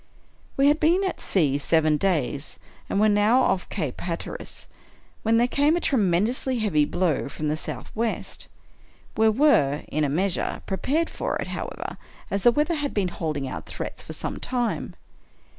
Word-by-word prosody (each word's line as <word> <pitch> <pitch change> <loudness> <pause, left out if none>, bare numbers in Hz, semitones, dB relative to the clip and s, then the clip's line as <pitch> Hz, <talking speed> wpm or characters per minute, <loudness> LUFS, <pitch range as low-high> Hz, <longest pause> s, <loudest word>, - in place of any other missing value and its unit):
We 275 - +4
had 295 +2 +4
been 345 +5 +3
at 380 - -2
sea 145 -7 +1
seven 155 0 +3
days, 150 -6 0 0.3
and 200 - +1
were 215 - +5
now 210 +4 +4
off 190 -1 0
Cape 140 -5 -3
Hatteras, 170 -1 -5 0.5
when 225 +1 +3
there 240 +1 +4
came 290 +5 +3
a - - +1
tremendously 235 - +1
heavy 190 -10 +2
blow 160 -4 0
from 150 +1 -3
the 150 - +1
southwest. 160 - -4 0.7
We 220 0 +4
were, 210 - +3
in 155 +1 0
a 145 - +1
measure, 180 +5 -1
prepared 280 - 0
for - - -2
it, - - -3
however, - - -5 0.3
as 200 - 0
the 240 - +6
weather 300 +7 +1
had 295 -3 -2
been 195 -3 +1
holding 155 -5 -3
out - - -6
threats - - -6
for - - -8
some - - -5
time. 245 -2 -2
200 Hz, 165 wpm, -25 LUFS, 155-255 Hz, 0.7 s, the